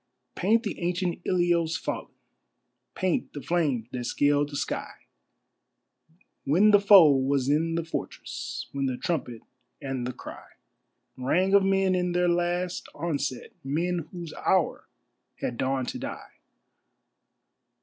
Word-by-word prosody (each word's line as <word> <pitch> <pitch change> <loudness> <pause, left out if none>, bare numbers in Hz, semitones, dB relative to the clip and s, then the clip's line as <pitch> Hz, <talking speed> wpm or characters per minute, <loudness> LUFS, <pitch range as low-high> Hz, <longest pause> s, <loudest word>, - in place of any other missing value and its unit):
Paint 220 +6 +2
the 205 - -4
ancient 175 0 -1
Ilios 175 -3 +2
fallen; - - -4 0.9
paint 185 -2 -1
the 145 - -6
flames 150 -10 0
that 125 -1 -4
scaled 145 +3 +2
the 145 - -7
sky, - - -3 1.5
When 185 +10 +4
the 205 - +7
foe 195 -6 +8
was 135 -1 +1
in 165 +3 +1
the 165 - -1
fortress, 165 - -5
when 135 -1 -1
the 130 -1 -2
trumpet 125 -9 -3 0.4
and 135 -4 -3
the - - -2
cry - - -10 0.7
Rang 180 +10 +1
of 200 -1 +6
men 195 -1 +2
in 180 -1 0
their 180 0 +2
last 175 +1 -1
onset, 145 -5 -3
men 165 +4 -1
whose 175 -3 -7
hour - - 0 0.5
had 120 - -3
dawned 130 -1 -1
to - - -5
die. - - -7
165 Hz, 130 wpm, -27 LUFS, 140-180 Hz, 1.5 s, foe